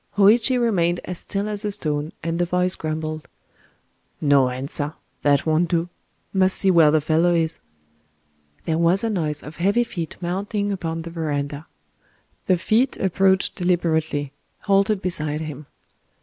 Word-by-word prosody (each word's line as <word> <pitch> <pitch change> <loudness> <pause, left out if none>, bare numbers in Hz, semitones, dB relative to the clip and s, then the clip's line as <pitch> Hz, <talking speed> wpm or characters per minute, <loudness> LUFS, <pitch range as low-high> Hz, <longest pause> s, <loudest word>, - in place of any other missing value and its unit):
Hōïchi 230 +5 +5
remained 175 -7 +1
as 180 -1 -6
still 200 +1 -3
as 210 0 -3
a 210 - -1
stone,—and 165 -2 -3
the 175 - +2
voice 180 +1 0
grumbled:— 155 -1 -4 0.9
"No 140 -3 +4
answer!—that 145 +2 -2
won't 160 +2 +2
do!... 170 +1 0 0.4
Must 190 -1 +3
see 195 - +4
where 165 -4 +6
the 155 +1 +3
fellow 165 +3 +2
is."... 165 -1 0 1.1
There 160 0 0
was 170 +5 +3
a 225 - 0
noise 155 -7 -2
of 150 - -10
heavy 200 +7 +2
feet 170 -8 -6
mounting 200 +4 -2
upon 165 -4 -3
the 170 - -8
verandah. 145 -2 -3 0.8
The 185 - +4
feet 230 +9 +1
approached 190 0 +2
deliberately,—halted 175 +3 0
beside 155 -4 0
him. 150 -2 -7
170 Hz, 135 wpm, -22 LUFS, 155-195 Hz, 1.1 s, where